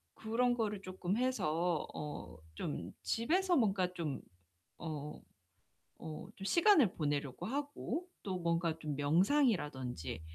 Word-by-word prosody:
그런 240 +3 +2
거를 210 -4 -1
쪼끔 185 +1 -2
해서 175 -10 +1
어 145 - -6 0.2
좀 - - -3
집에서 355 +10 +2
뭔가 195 -6 +2
좀 160 -6 -3 0.6
어 150 -2 -5 0.8
어 155 -1 -7
좀 195 - -7
시간을 335 - +6
보내려고 145 -3 -1
하고 290 +6 -2 0.2
또 185 -2 -2
뭔가 170 -1 +1
좀 150 -3 -3
명상이라든지 145 - +2
180 Hz, 220 characters per minute, -35 LUFS, 150-240 Hz, 0.8 s, 시간을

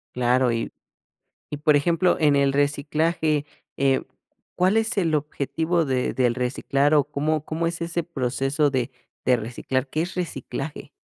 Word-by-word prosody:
Claro, 125 0 +3
y 115 0 -2 0.8
y 150 - -3
por 150 0 +4
ejemplo, 170 +4 +2
en 150 -2 +4
el 140 -1 +3
reciclaje, 150 +2 +1 0.3
eh, 135 -1 +2 0.5
¿cuál 185 +4 +2
es 225 -1 +1
el 165 -5 +2
objetivo 160 +3 0
de 130 -2 0
del 125 -2 +2
reciclar?, 135 +3 +1
o 145 -2 +5
¿cómo 150 +1 -1
cómo 160 +2 -2
es 170 0 -2
ese 170 0 -1
proceso 140 -1 0
de 130 -1 -1 0.3
de 125 - +4
reciclar? 125 +3 -3
¿Qué 155 +4 -1
es 180 +2 -5
reciclaje? 155 -4 -5
145 Hz, 150 wpm, -24 LUFS, 135-165 Hz, 0.8 s, o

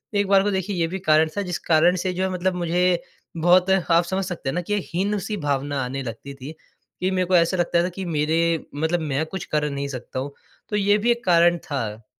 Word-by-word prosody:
एक 200 0 +2
बार 195 0 +5
को 205 - 0
देखिए 190 +1 -2
ये 165 -2 +1
भी 190 +3 -5
कारण 155 -2 +3
था - - +1
जिस 180 -3 -3
कारण 170 +2 +3
से 185 +1 -1
जो 185 +1 -2
है 190 - 0
मतलब 185 0 -1
मुझे 175 0 +1 0.4
बहुत 180 +3 +4
आप 175 -2 +3
समझ 190 +3 -2
सकते 170 -6 -4
हैं - - -2
ना, 175 - -1
कि 205 +4 -2 0.2
हीन-सी 205 +2 -1
भावना 145 -2 -1
आने 135 +2 -4
लगती 120 +4 -7
थी। 135 +2 -9 0.5
कि 185 - 0
मेरे 185 -1 +1
को 185 - +3
ऐसा 170 +2 +3
लगता 170 0 +2
था 180 - -1
कि 190 - -4
मेरे 155 -1 0 0.4
मतलब 160 +4 0
मैं 150 -1 -1
कुछ 185 +2 -6
कर 150 -1 -1
नहीं 140 0 -3
सकता 130 -1 -6
हूँ। 140 +2 -4 0.4
तो 210 - -2
ये 205 0 +3
भी 230 +3 +2
एक 240 0 -1
कारण 175 -1 +4
था। 110 -6 -4
175 Hz, 235 wpm, -23 LUFS, 150-190 Hz, 0.5 s, बार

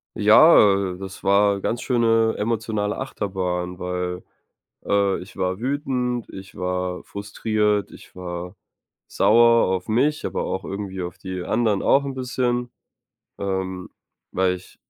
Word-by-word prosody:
Ja, - - +7 0.4
äh, - - -11
das 95 0 -9
war, 100 +1 +3
äh, - - -8
ganz 120 - -2
schöne 115 -2 +2
emotionale 105 -1 -1
Achterbahn. 90 -7 -3
Weil, 90 0 -3 0.6
äh, 100 -1 +1
ich 90 - -12
war 95 +2 -2
wütend, 125 -3 -2
ich 95 0 -11
war 90 0 -2
frustriert, 105 0 -1
ich - - -15
war 90 +1 -6 0.5
sauer 115 0 +4
auf 95 -1 -2
mich, 145 +8 +1
aber - - -2
auch 95 - -3
irgendwie 95 -1 -5
auf 90 0 -6
die 95 -1 -6
anderen 110 -3 +1
auch 140 - +4
'n 135 - -4
bisschen, 125 -2 -1 0.7
ähm, 95 -2 -3 0.4
weil 95 0 +1
ich 90 - -12
100 Hz, 135 wpm, -23 LUFS, 90-115 Hz, 0.7 s, Ja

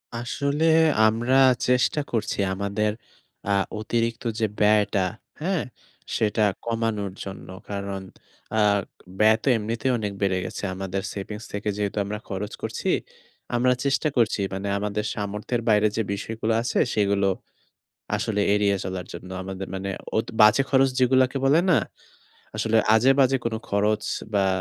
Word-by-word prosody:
আসলে 140 +6 -1 0.4
আমরা 120 +4 +1 0.3
চেষ্টা 125 +4 +2
করছি 110 -3 -1
আমাদের 100 +2 -1 0.6
আ - - +2 0.3
অতিরিক্ত 115 +1 -1 0.2
যে 110 - +2
ব্যয়টা, 105 -2 +3 0.4
হ্যাঁ? 180 0 0 0.5
সেটা 110 0 +1 0.2
কমানোর 115 -4 -1
জন্য। 95 -1 -8 0.2
কারণ 100 -1 -4 0.6
আ - - +3 0.6
ব্যয় 110 +1 +6
তো - - -5
এমনিতেই 115 +4 -1
অনেক 105 -3 -3
বেড়ে 95 -2 +1
গেছে। 90 - -6
আমাদের 95 0 -3
সেভিংস 105 +2 -6
থেকে 105 +1 -2
যেহেতু 105 0 -2
আমরা 105 +1 -4
খরচ 100 +1 -4
করছি, - - -3 0.7
আমরা 125 +1 +3
চেষ্টা 140 +3 +2
করছি 115 -3 +2
মানে 95 +1 -3
আমাদের 105 +1 -2
সামর্থ্যের 105 +4 -3
বাইরে 105 0 +5
যে 115 - +2
বিষয়গুলো 110 +2 -2
আছে, 120 - -1
সেগুলো 100 -1 +2 0.9
আসলে 105 -2 -1
এড়িয়ে 100 -1 +2
চলার 95 -1 -4
জন্য। 90 +2 -9
আমাদের 95 0 -6
মানে 95 +1 -3 0.3
অত 110 - -1
বাজে 105 +5 +7
খরচ 135 0 +5
যেগুলোকে 130 +1 +3
বলে 145 +5 +5
না? 155 - +5 0.8
আসলে 110 +1 +1 0.2
আজেবাজে 135 +3 +4
কোন 115 - -1 0.2
খরচ 105 +1 +1 0.3
বা 100 -1 +3
105 Hz, 135 wpm, -24 LUFS, 100-120 Hz, 0.9 s, বাজে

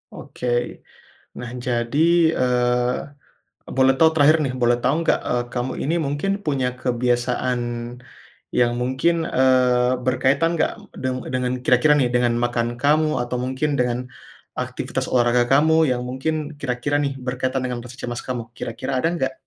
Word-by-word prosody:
Oke 125 - -7 0.9
nah 125 - -6 0.2
jadi, 120 +2 -1 0.4
eee, 125 +2 0 0.5
boleh 130 0 +5
tahu 160 -1 +6
terakhir 155 +1 +5
nih, 130 - -1
boleh 120 0 +3
tahu 130 +3 +2
nggak, - - +3
eee, 120 0 +1
kamu 125 +1 -2
ini 160 - 0
mungkin 145 +7 -2 0.2
punya 135 -4 0
kebiasaan 125 0 0 1.0
yang 120 -1 +3
mungkin, 130 +7 +1 0.2
eee, 125 -1 +4
berkaitan 130 +6 +2
nggak - - +1 0.3
deng 130 0 -1 0.2
dengan 125 -1 0
kira-kira 125 +5 +4
nih 125 - +2
dengan 120 -1 +3
makan 120 -1 0
kamu 155 +2 +3
atau 120 +1 -3
mungkin 130 +4 -1
dengan 125 -1 +1 0.6
aktivitas - - -3
olahraga 120 -1 +3
kamu 155 +3 +4 0.2
yang 125 0 -2
mungkin 130 +5 -2 0.3
kira-kira 130 +2 -1
nih 140 - -1
berkaitan 130 +1 -1
dengan 125 -1 -3
rasa 125 +1 -11
cemas 120 0 -4
kamu, 125 -2 -2 0.2
kira-kira 115 +4 -5
ada 165 - +1
nggak? 130 -4 -1
125 Hz, 145 wpm, -22 LUFS, 125-140 Hz, 1.0 s, tahu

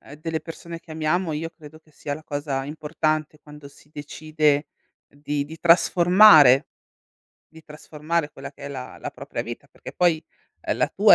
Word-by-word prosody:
ehm, 140 - -13
delle 160 +1 -4
persone 165 +1 -9
che 165 - -19
amiamo, 160 +2 -1
io 160 +2 -3
credo 155 -2 -15
che 155 -1 -28
sia 145 - -6
la 155 - -11
cosa 145 -2 -3
importante 155 0 -2
quando 150 -1 -13
si 145 - -21
decide 150 0 -1 0.4
di 145 0 -4
di 160 +2 -11
trasformare 175 -5 +6 0.8
di 160 0 -17
trasformare 150 +1 -4
quella 135 0 -9
che 140 - -17
è 140 - -6
la 130 -2 -8
la - - -6
propria - - -6
vita, - - -8
perché - - -11
poi, 170 -3 +2 0.4
ehm, - - -2
la - - +1
tua - - +6
155 Hz, 170 wpm, -23 LUFS, 145-165 Hz, 0.8 s, trasformare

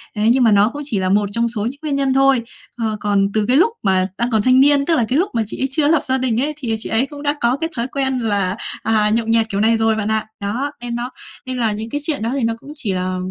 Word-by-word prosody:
Thế 215 +1 +1
nhưng 255 +1 +3
mà 225 - +4
nó 205 +1 +4
cũng 290 - -6
chỉ 225 -9 0
là 185 0 -1
một 205 +1 +1
trong 235 +3 0
số 225 -3 -2
những 265 +5 -5
nguyên 300 -3 -2
nhân 275 -1 +1
thôi, 270 -2 +3 0.4
ờ, 220 -2 -2
còn 200 -1 +1
từ 215 -1 +1
cái 255 +5 +3
lúc 405 +9 +4
mà 185 -1 +2
đang 240 +1 0
còn 220 -2 +2
thanh 255 +4 +4
niên, 280 0 +4
tức 330 +1 +2
là 240 - +1
cái 260 +6 +1
lúc 385 +3 0
mà 230 - +1
chị 210 - -5
ấy 265 - +1
chưa 290 +3 +2
có 295 - +3
lập 325 - +2
gia 260 0 +1
đình 250 -2 0
ấy, 300 +2 -1
thì, 250 -6 -3
ờ, - - +2
chị - - -5
ấy 225 +4 +3
cũng 285 +1 -11
đã 290 0 +2
có 240 +3 +2
cái 325 +2 -3
thói 235 +1 -2
quen 265 -1 -1
là, 200 -5 0 0.3
à, 215 -1 +2
nhậu 225 +1 +1
nhẹt 225 -1 +2
kiểu 200 - -2
này 225 +1 +3
rồi 225 0 +2
bạn 215 -1 -2
ạ. 220 0 0 0.2
Đó, 240 +9 -2
nên 240 -1 -4
nó 240 +1 -4 0.4
nên 255 0 -4
là 230 -3 +1
những 215 +2 -5
cái 290 +5 -3
chuyện 300 -4 0
đó 230 - -1
thì 275 -3 -2
nó 230 0 +1
cũng 285 - -12
chỉ 220 -10 -1
là, 185 0 -2
235 Hz, 315 wpm, -18 LUFS, 215-270 Hz, 0.4 s, mà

